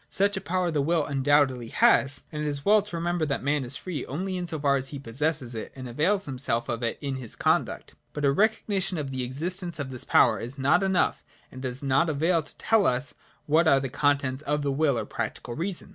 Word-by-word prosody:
Such 200 +1 +2
a 195 - -3
power 180 -1 -1
the 150 -2 +1
will 160 +1 +1
undoubtedly 135 -3 +2
has: 140 +4 +3
and 150 - -4
it 150 - -1
is 145 -1 -4
well 210 +1 +6
to 200 -3 -8
remember 170 0 -1
that 140 -2 -2
man 145 0 +1
is 125 +3 -2
free 180 -5 -5
only 185 +7 -3
in 180 -1 -3
so 160 -2 -3
far 140 -1 +2
as 135 -1 -2
he 140 - -7
possesses 135 +1 -2
it 110 - -6
and 130 -1 -7
avails 165 - +1
himself 125 -4 0
of 120 0 -2
it 115 -1 -1
in 140 -2 -3
his 120 -4 -7
conduct. - - 0 0.2
But 150 -1 -2
a 140 - +4
recognition 200 0 +1
of 140 -3 -4
the 130 -1 -2
existence 170 +7 -2
of 140 -3 -4
this 125 - -3
power - - +4
is 125 +4 -6
not 140 +6 +3
enough 190 -2 +1 0.3
and 130 - -9
does 130 +1 -5
not 140 +5 +2
avail 165 +3 +2
to 150 - -13
tell 220 -2 +3
us 130 +3 0 0.3
what 160 +3 +3
are 140 -3 +5
the 135 -1 -3
contents 140 -1 0
of 150 -1 -1
the 140 - 0
will 140 -2 +1
or - - -2
practical 120 - -4
reason. 180 +6 -3
145 Hz, 235 wpm, -26 LUFS, 130-170 Hz, 0.3 s, well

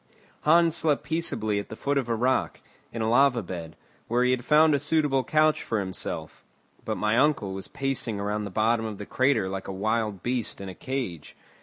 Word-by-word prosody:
Hans 165 +1 +4
slept 150 -3 +1
peaceably 130 -10 -1
at 100 - -7
the - - -7
foot 140 +4 0
of 125 -3 -4
a 115 - +1
rock, 125 +3 0 0.3
in 115 -1 -3
a - - 0
lava 120 0 +4
bed, 85 -3 -7 0.3
where 120 +2 +2
he 125 - +3
had 125 -1 0
found 155 +3 +5
a 145 - +2
suitable 145 -3 +1
couch 155 +1 +2
for 115 - -2
himself; 95 -2 -5 0.4
but - - -3
my 105 +1 +1
uncle 130 -9 +2
was 95 0 -5
pacing 130 -6 -2
around 105 +1 -2
the 100 - -5
bottom 110 +3 +1
of 105 -2 -6
the 105 - -7
crater 130 -6 +1
like 95 0 -5
a - - -4
wild 105 0 -1
beast 120 -2 -2
in 100 -1 -6
a - - -7
cage. 120 - -5
115 Hz, 205 wpm, -26 LUFS, 100-140 Hz, 0.4 s, found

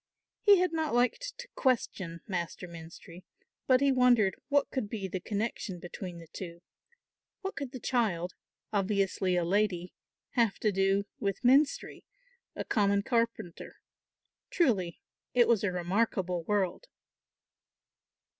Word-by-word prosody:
He 410 -2 +7
had 360 -2 +1
not 315 -5 0
liked 485 - +1
to - - -8
question 190 - 0
Master 180 -1 -4
Menstrie, 170 +2 -11 0.4
but 255 0 +5
he 280 -1 +4
wondered 245 -7 +4 0.2
what 285 -1 +2
could 240 -7 -2
be 205 -3 -3
the 185 0 -3
connection 205 -2 -3
between 175 0 -7
the 165 - -10
two; 170 -1 -8 0.8
what 390 0 -4
could 275 -3 -5
the 260 - -7
child, 195 -9 0 0.4
obviously 195 -2 +1
a 175 -1 +1
lady, 185 -2 0 0.4
have 230 -4 +2
to 215 - +3
do 195 +1 +2
with 200 +3 -2
Menstrie, 275 +4 +3 0.5
a - - -4
common 200 -2 +2
carpenter? 230 -7 -2 0.7
Truly 200 - +1 0.4
it 240 -1 +6
was 225 -4 +3
a 200 - +1
remarkable 180 0 0
world. 205 - 0
200 Hz, 130 wpm, -30 LUFS, 180-245 Hz, 0.8 s, He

